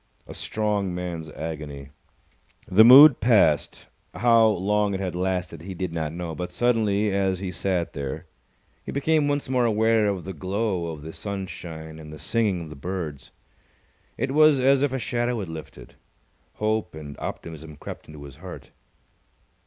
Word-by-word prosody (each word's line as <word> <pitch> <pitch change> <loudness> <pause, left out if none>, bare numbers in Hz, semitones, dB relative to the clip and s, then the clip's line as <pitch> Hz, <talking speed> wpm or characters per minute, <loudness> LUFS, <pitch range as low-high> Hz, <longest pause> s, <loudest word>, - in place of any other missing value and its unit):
A - - -10
strong 105 -4 -1
man's 85 -3 -5
agony. 75 -3 -7 0.8
The 100 +4 +6
mood 135 +4 +10
passed. 100 -11 +2 0.3
How 115 -1 +5
long 105 0 +1
it - - -3
had 95 -2 -3
lasted, 90 -2 -2
he 95 +2 -7
did 90 -1 -4
not 80 -2 -2
know. 85 0 -5
But 90 +2 -5
suddenly, 110 -3 +1
as 95 -1 +1
he 95 0 -4
sat 90 -3 -2
there, 70 -2 -5 0.6
he - - -6
became 150 +1 +1
once 145 0 -1
more 130 -1 +1
aware 110 -1 +3
of 95 -4 -2
the 95 - -5
glow 95 0 -2
of 80 -3 -7
the 80 +1 -8
sunshine 85 -5 -7
and 75 -1 -10
the 75 - -9
singing 100 +1 0
of 80 - -10
the - - -8
birds. 75 -3 -5 0.9
It 135 - -1
was 155 -1 +5
as 135 +1 +4
if 145 -2 +1
a 130 - -1
shadow 120 0 -1
had 95 -5 -5
lifted. 80 -1 -10 0.6
Hope 110 -5 -1
and 75 -2 -8
optimism 80 -2 -7
crept - - -9
into 75 -2 -11
his 70 -2 -11
heart. - - -10
95 Hz, 165 wpm, -25 LUFS, 80-110 Hz, 0.9 s, mood